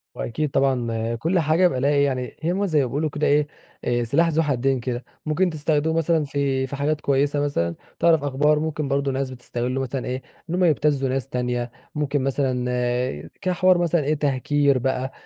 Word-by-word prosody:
وأكيد 150 +5 -2
طبعًا 120 -4 0
كل 165 +10 +1
حاجة 160 +3 +4
بقى 130 -7 -2
ليها 140 - +3
إيه 145 -1 +3
يعني، 130 -2 -2
هي 165 +2 0
ما 200 +2 0
زي 155 -6 +2
ما - - +1
بيقولوا 150 +5 -1
كده 150 +1 -1
إيه 145 +1 +3 0.4
آآ 120 0 +1
سلاح 150 +9 +2
ذو 165 0 +2
حدين 135 -2 +1
كده، 120 0 -4 0.2
ممكن 165 +4 +1
تستخدمه 155 0 0
مثلًا 165 -1 +2
في 135 -2 -1
في 140 - -5
حاجات 150 +2 -1
كويّسة 140 +1 +1
مثلًا، 85 -13 -1 0.2
تعرف 165 -3 +4
أخبار 145 +2 +2
ممكن 155 -2 -2
برضو 140 0 0
ناس 135 0 -2
بتستغله 125 +1 -3
مثلًا 130 0 -3
إيه، 130 +1 -3 0.3
إن 175 - -1
هم 185 - +1
يبتزوا 145 -4 +2
ناس 130 0 -1
تانية، 125 -1 -2 0.2
ممكن 145 -2 0
مثلًا 125 - -1
كحوار 185 -1 +3
مثلًا 170 -2 +1
إيه 145 +2 +1
تهكير 145 -1 +1
بقى، 130 +1 -1
140 Hz, 190 wpm, -23 LUFS, 130-155 Hz, 0.4 s, حاجة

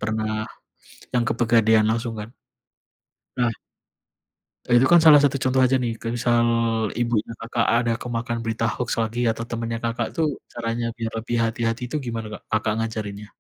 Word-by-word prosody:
pernah 110 0 -2 0.7
yang 120 - +3
ke 115 - -1
pegadaian 110 -2 +4
langsung 115 +1 -1
kan. 105 +1 -6 1.1
Nah 120 -2 +2 1.2
itu 120 +2 +5
kan 175 -1 +8
salah 150 -2 +10
satu 140 0 +1
contoh 130 0 +2
aja 130 +1 +3
nih 120 - 0
kayak 115 +1 -4
misal 120 -1 +2 0.5
ibunya 115 -2 0
Kakak 115 +1 -1
ada 120 -1 +1
kemakan 120 -1 -3
berita 115 0 -1
hoax 125 - -4
lagi, 115 +1 -2
atau 115 +1 -5
temannya 115 0 -3
Kakak 115 0 -1
tuh 165 -3 +1 0.3
caranya 115 0 -2
biar 115 -1 -3
lebih 115 +1 -3
hati-hati 115 +1 -2
itu 155 - -5
gimana 115 -2 -4
Kak, - - -8
Kakak 110 0 +1
ngajarinnya? 105 -2 -4
115 Hz, 160 wpm, -23 LUFS, 110-120 Hz, 1.2 s, salah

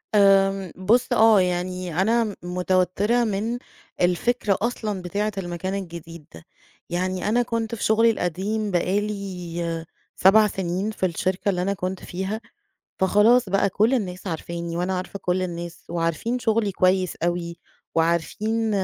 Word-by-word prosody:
آمم 195 -2 +4
بُص 230 +7 +2
آه، 220 -4 +6
يعني 180 -1 -1
أنا 230 +3 +3
م 210 -2 -3
متوتّرة 185 +6 +1
من 220 +3 -1 0.4
الفكرة 195 +4 +1
أصلًا 215 -5 -2
بتاعة 205 +4 -2
المكان 175 +1 -3
الجديد 170 -4 -7
ده. 80 - -12 0.5
يعني 185 +3 -1
أنا 240 +3 +3
كنت 230 -1 -2
في 215 - -6
شُغلي 225 +1 +4
القديم 200 +3 -2
بقى 185 +3 +1
لي 175 -5 -4 0.3
7 210 +3 +6
سِنين 190 +2 -2
في 190 - -2
الشركة 185 +3 -1
اللي 180 -2 0
أنا 200 +2 0
كنت 185 -1 -4
فيها، 190 +5 -4 0.6
فخلاص 210 +4 +4
بقى 195 +1 +2
كل 215 +7 +2
الناس 185 -5 -3
عارفاني 170 0 -4
وأنا 180 +1 -1
عارفة 185 +2 -5
كل 180 +1 0
الناس 170 -1 -6
وعارفين 170 +8 -1
شُغلي 220 -3 +1
كويس 185 0 +2
أوي 170 0 -2 0.4
وعارفين 205 +7 0
190 Hz, 140 wpm, -24 LUFS, 175-215 Hz, 0.6 s, آه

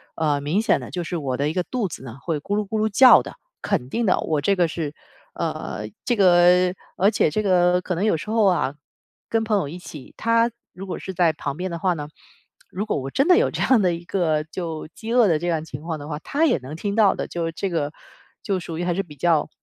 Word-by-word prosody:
呃， 150 -3 +1
明 155 +9 0
显 230 - +2
的 - - -9
就 175 -1 -3
是 175 +1 -3
我 130 -4 -2
的 145 +2 0
一 155 - -3
个 180 - 0
肚 235 -1 -2
子 140 - -9
呢 125 0 -9
会 160 -4 -2
咕 200 +7 -3
噜 210 -1 -1
咕 220 +1 -2
噜 215 - +2
叫 255 +5 +7
的， - - -9 0.3
肯 160 -12 -1
定 230 +7 -1
的。 185 - +3
我 155 -2 -1
这 195 +7 +2
个 175 -3 +2
是， 155 -2 -4 0.4
呃 105 +3 -4 0.2
这 240 - +2
个 180 -1 +5 0.2
而 195 +3 +4
且 155 - +1
这 215 - 0
个 180 -2 +3
可 180 -1 -3
能 190 - 0
有 210 - +3
时 155 - -8
候 220 -2 +3
啊， 170 -7 +1 0.5
跟 225 -1 +1
朋 215 -2 +1
友 175 - -1
一 175 +5 -8
起， 150 -6 -11
他 230 +1 +2 0.2
如 195 +2 -8
果 185 - -5
是 190 - -6
在 170 -3 +3
旁 140 -2 -5
边 185 0 -3
的 170 - -4
话 185 0 +1
呢， 150 -1 -6 0.6
如 200 +4 -4
果 - - -1
我 135 - -5
真 275 - +1
的 360 -1 +6
有 - - +3
这 - - -4
样 255 -5 +4
的 180 -2 +2
一 170 - -10
个 160 -5 0
就 160 -1 -6
饥 225 +1 -5
饿 240 -3 +5
的 160 -4 +2
这 175 - -3
样 160 -2 -1
情 140 -2 -8
况 160 -1 -4
的 145 0 -9
话， 150 -1 -4
他 300 - 0
也 295 - +2
能 130 +4 -8
听 200 +5 -3
到 215 -3 +4
的， - - -4
就 170 -1 -3
这 175 +3 -4
个 150 -3 -1 0.5
就 195 -2 -1
属 165 -2 -6
于 175 - -2
还 175 0 0
是 195 - 0
比 150 -6 -12
较， 160 +1 +1
175 Hz, 280 characters per minute, -23 LUFS, 155-200 Hz, 0.6 s, 叫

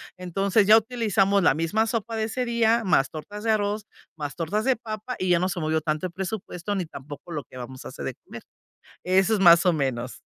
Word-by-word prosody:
Entonces 195 +3 +1
ya 220 +1 +9
utilizamos 210 -4 +1
la 145 - +4
misma 190 +8 0
sopa 225 0 -2
de 220 0 0
ese 250 +3 -2
día, 235 -1 +2
más 145 -6 +3
tortas 205 +7 -8
de - - 0
arroz, 210 0 -1 0.3
más 145 -3 -5
tortas 195 +6 -1
de 265 -1 +3
papa, 220 +2 -6
y 185 - -2
ya 175 -1 +4
no 185 +1 0
se 175 -1 -3
movió 155 0 0
tanto 155 +2 -2
el 180 - -4
presupuesto, 190 0 -4
ni 185 -3 -2
tampoco 145 +3 -10
lo 150 -3 -4
que 130 - -13
vamos 130 +1 -8
a - - -5
hacer - - -8
de - - -3
comer. - - -10 0.6
Eso 190 +4 +3
es - - -2
más 170 -1 +7
o 175 - +5
menos. 130 -4 -3
190 Hz, 225 wpm, -25 LUFS, 160-220 Hz, 0.6 s, ya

